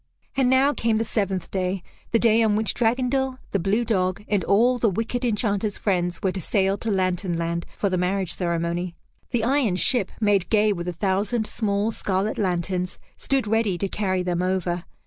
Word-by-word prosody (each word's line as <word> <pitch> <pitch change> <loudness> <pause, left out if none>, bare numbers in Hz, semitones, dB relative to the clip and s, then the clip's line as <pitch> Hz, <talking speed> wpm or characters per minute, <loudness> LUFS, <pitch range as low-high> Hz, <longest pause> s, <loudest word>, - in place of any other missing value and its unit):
And 260 -2 +3
now 265 +3 +4
came 225 -4 +1
the 225 - +1
seventh 195 -5 -2
day, 185 -1 -2 0.3
the 230 - +4
day 230 0 +4
on 215 -2 +3
which 215 +1 +1
Dragondel, 255 +2 0
the 200 - +1
blue 205 +7 +1
dog, 185 -3 0
and 205 -3 +1
all 245 +5 +3
the 225 - +3
wicked 225 +5 -2
Enchanter's 210 -3 0
friends 180 -3 -1
were 190 - +2
to 190 0 -5
sail 195 +1 +1
to 230 - -3
Lantern 185 -2 0
Land 170 0 -2
for 200 - +1
the 185 -2 0
marriage 185 0 0
ceremony. 170 0 -2 0.3
The 240 -3 0
iron 250 -5 +2
ship, 200 +2 +3
made 205 -4 +2
gay 215 -1 +3
with 175 -2 -5
a - - 0
thousand 200 +5 0
small 210 0 -1
scarlet 200 0 -1
lanterns, 180 -1 -1 0.2
stood 270 -3 0
ready 215 -3 +1
to 195 - -1
carry 185 -2 -1
them 180 -1 -1
over. 180 -1 -1
200 Hz, 185 wpm, -24 LUFS, 185-225 Hz, 0.3 s, now